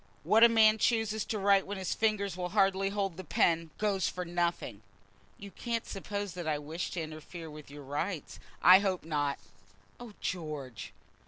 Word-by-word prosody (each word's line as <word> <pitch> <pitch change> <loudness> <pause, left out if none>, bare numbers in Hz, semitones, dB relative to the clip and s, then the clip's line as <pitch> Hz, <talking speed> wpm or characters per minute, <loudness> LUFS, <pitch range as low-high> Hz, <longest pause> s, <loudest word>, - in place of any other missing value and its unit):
What 225 +2 +5
a 235 - +9
man 220 -1 +5
chooses 220 -2 +1
to 220 - -3
write 200 -1 +3
when 200 0 -4
his 190 -1 -2
fingers 205 -4 0
will 180 -1 -3
hardly 195 0 +2
hold 195 -4 -2
the 185 - -6
pen, 165 0 +1
goes 200 -3 0
for 180 0 -4
nothing." 170 - -2 0.6
"You 200 0 -10
can't 230 +1 -3
suppose 200 -1 -5
that 175 -2 -6
I 155 -1 +1
wish 155 +4 -5
to 175 - -2
interfere 160 +1 -8
with 150 -1 -11
your 145 0 -10
rights?" 150 +4 -4 0.2
"I 185 +1 +9
hope 190 -3 -1
not." 145 -3 -1 0.6
"Oh, 240 -3 -10
George!" 150 - -5
185 Hz, 175 wpm, -31 LUFS, 160-205 Hz, 0.6 s, a